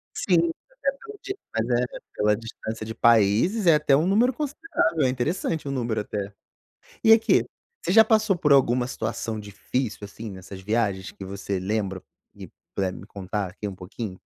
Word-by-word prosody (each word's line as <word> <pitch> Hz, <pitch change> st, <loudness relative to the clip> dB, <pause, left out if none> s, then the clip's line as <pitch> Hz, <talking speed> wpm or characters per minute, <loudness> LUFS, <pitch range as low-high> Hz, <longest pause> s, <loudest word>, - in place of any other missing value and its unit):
Sim. 170 Hz, -3 st, +2 dB, 0.3 s
Mas -, -, +5 dB
é -, -, -16 dB
pela 425 Hz, +7 st, -11 dB
di 390 Hz, -, -4 dB, 0.2 s
mas 115 Hz, 0 st, 0 dB
é, 125 Hz, -, +1 dB, 0.3 s
pela 105 Hz, 0 st, +3 dB
distância 110 Hz, -1 st, -6 dB
de 110 Hz, -, -5 dB
países, 115 Hz, -, +4 dB
é 165 Hz, -, +8 dB
até 150 Hz, -2 st, +4 dB
um 155 Hz, +4 st, +2 dB
número 225 Hz, +6 st, +4 dB
considerável, 275 Hz, -, -1 dB
é 130 Hz, -, +3 dB
interessante 150 Hz, +4 st, -1 dB
o 140 Hz, -, -2 dB
número, 115 Hz, -5 st, -1 dB
até. 100 Hz, -1 st, -5 dB, 0.7 s
E 225 Hz, -, +6 dB
aqui, 225 Hz, 0 st, +5 dB, 0.4 s
você -, -, 0 dB
já 220 Hz, +3 st, +8 dB
passou 215 Hz, -3 st, +3 dB
por 150 Hz, -3 st, +4 dB
alguma 125 Hz, -2 st, +3 dB
situação 110 Hz, -2 st, -3 dB
difícil, 105 Hz, +3 st, -3 dB
assim, 105 Hz, +2 st, -7 dB
nessas 95 Hz, 0 st, -9 dB
viagens 100 Hz, -2 st, -1 dB
que 95 Hz, -, -9 dB
você 100 Hz, 0 st, -3 dB
lembra 95 Hz, -1 st, -2 dB, 0.3 s
e -, -, -10 dB, 0.3 s
puder 95 Hz, -1 st, 0 dB
me -, -, -10 dB
contar 100 Hz, 0 st, -4 dB
aqui 105 Hz, +3 st, -6 dB
um 100 Hz, -, -6 dB
pouquinho? 95 Hz, +1 st, -7 dB
115 Hz, 180 wpm, -25 LUFS, 100-165 Hz, 0.7 s, é